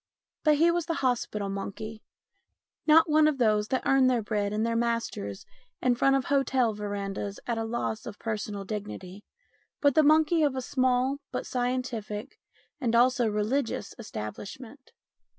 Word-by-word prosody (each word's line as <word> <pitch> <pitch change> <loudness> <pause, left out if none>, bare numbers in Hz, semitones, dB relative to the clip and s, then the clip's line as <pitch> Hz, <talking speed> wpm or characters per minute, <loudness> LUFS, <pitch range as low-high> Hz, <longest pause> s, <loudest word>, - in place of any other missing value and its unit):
But 305 -1 +5
he 330 +3 +4
was 340 -1 -1
the 330 - -1
hospital 220 -5 0
monkey; 205 +3 -5 0.9
not 320 +2 +7
one 305 0 +5
of 305 -3 +1
those 215 -4 +2
that 260 - -1
earn 270 -1 +4
their 245 -3 +2
bread 205 -1 -1
and 215 +2 0
their 230 0 0
master's 230 - -2 0.3
in 250 - +2
front 270 +3 +3
of 270 - 0
hotel 265 -4 +2
verandahs 200 -1 -4
at 235 -2 -1
a - - -1
loss 225 -1 -3
of 210 -3 -7
personal 210 -3 -4
dignity, 205 -2 -6 0.6
but 285 -2 +4
the 310 - +5
monkey 310 +2 +4
of 290 -3 +2
a 260 - -2
small 255 +1 +1
but - - -3
scientific 245 -2 -3 0.4
and 235 -4 0
also 245 0 +4
religious 220 +5 -1
establishment. 220 - -8
235 Hz, 155 wpm, -28 LUFS, 210-270 Hz, 0.9 s, not